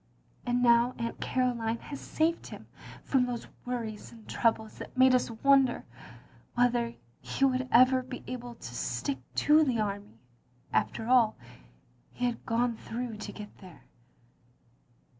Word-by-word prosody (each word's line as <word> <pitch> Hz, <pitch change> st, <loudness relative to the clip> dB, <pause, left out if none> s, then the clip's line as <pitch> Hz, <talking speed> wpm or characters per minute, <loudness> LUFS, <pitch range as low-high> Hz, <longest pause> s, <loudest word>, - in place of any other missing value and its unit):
And 245 Hz, 0 st, +1 dB
now 235 Hz, +1 st, +5 dB
Atint 230 Hz, 0 st, -4 dB
Caroline 235 Hz, -3 st, 0 dB
has 280 Hz, +4 st, -8 dB
saved 330 Hz, +2 st, 0 dB
him -, -, -10 dB, 0.4 s
from 255 Hz, -2 st, +2 dB
those 240 Hz, -2 st, -4 dB, 0.2 s
worries 230 Hz, -4 st, -4 dB
and 225 Hz, -2 st, -15 dB
troubles 220 Hz, -2 st, 0 dB
that -, -, -9 dB
made 260 Hz, 0 st, +6 dB
us 250 Hz, -1 st, +2 dB
wonder 265 Hz, +2 st, +3 dB, 0.7 s
whether 240 Hz, -1 st, +2 dB, 0.2 s
he 125 Hz, -, 0 dB
would 255 Hz, -1 st, 0 dB
ever 255 Hz, +2 st, +6 dB
be 255 Hz, 0 st, -8 dB
able 245 Hz, -1 st, -6 dB
to 125 Hz, -, -9 dB
stick 120 Hz, +3 st, -2 dB, 0.2 s
to 305 Hz, +1 st, +5 dB
the 255 Hz, -6 st, 0 dB
army, 205 Hz, -, -3 dB, 0.6 s
after 220 Hz, -, 0 dB
all 240 Hz, -3 st, +4 dB, 0.8 s
he 245 Hz, -, -2 dB
had 240 Hz, -1 st, -3 dB
gone 235 Hz, +1 st, +1 dB
through 235 Hz, -1 st, -5 dB
to 215 Hz, -, -6 dB
get 210 Hz, -1 st, -10 dB
there. 180 Hz, -6 st, -14 dB
240 Hz, 140 wpm, -30 LUFS, 225-255 Hz, 0.8 s, made